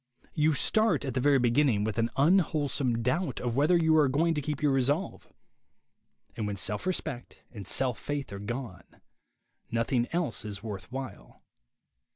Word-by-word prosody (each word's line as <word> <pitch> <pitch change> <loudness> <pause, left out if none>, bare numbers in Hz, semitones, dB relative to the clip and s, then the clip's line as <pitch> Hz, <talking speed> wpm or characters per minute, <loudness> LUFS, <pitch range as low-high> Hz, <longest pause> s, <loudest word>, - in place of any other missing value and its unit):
You 155 0 +2
start 215 -4 +1
at 130 - -3
the - - 0
very 140 +2 +4
beginning 120 -3 +2
with 110 +1 -2
an 115 +1 +1
unwholesome 145 -6 +2
doubt 165 +9 -1
of 120 -2 -2
whether 150 +6 +4
you 160 -1 +3
are 150 -2 +5
going 160 +6 +2
to 150 - -1
keep 150 0 -3
your 150 -2 +2
resolve. 140 +7 0 1.1
And 110 - -3
when 100 -1 -3
self 105 - -2
respect 155 -9 -4
and 100 -5 -9
self 130 -3 0
faith 145 -7 -4
are 100 - -6
gone, 110 -3 -7 0.7
nothing 120 +1 0
else 165 -12 -1
is 105 0 -7
worth 100 -2 -7
while. 130 -5 -8
135 Hz, 165 wpm, -29 LUFS, 115-150 Hz, 1.1 s, are